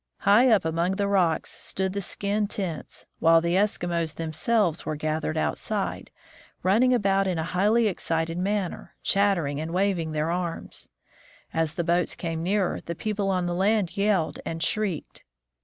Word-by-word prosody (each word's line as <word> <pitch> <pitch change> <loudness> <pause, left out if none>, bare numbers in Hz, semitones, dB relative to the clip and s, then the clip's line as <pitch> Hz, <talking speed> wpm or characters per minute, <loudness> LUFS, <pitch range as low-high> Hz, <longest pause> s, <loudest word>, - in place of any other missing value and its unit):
High 215 +6 +5
up 210 -7 +4
among 165 +3 0
the 200 +1 0
rocks 180 -5 +1
stood 190 0 -3
the 200 - -2
skin 205 +2 -1
tents, 185 -6 -5
while 165 0 +6
the 170 +1 -1
Eskimos 175 -5 0
themselves 165 +3 0
were 155 - -3
gathered 155 - -2
outside, 75 -1 -2 0.5
running 220 +8 +4
about 195 -5 +2
in 180 -2 0
a 160 - -1
highly 210 +7 +2
excited 165 -3 -2
manner, 195 -1 -2
chattering 175 -8 +2
and 160 +1 -4
waving 185 -4 +1
their 155 +2 0
arms. 175 -1 -4 0.6
As 160 -1 0
the 170 - -1
boats 175 +1 +1
came 165 -2 -3
nearer, 190 +2 0
the 170 - -5
people 205 +1 -2
on 185 -2 +1
the 175 - -1
land 195 0 +1
yelled 200 -5 +1
and 165 0 -3
shrieked. 200 -4 -2
180 Hz, 155 wpm, -26 LUFS, 165-200 Hz, 0.6 s, while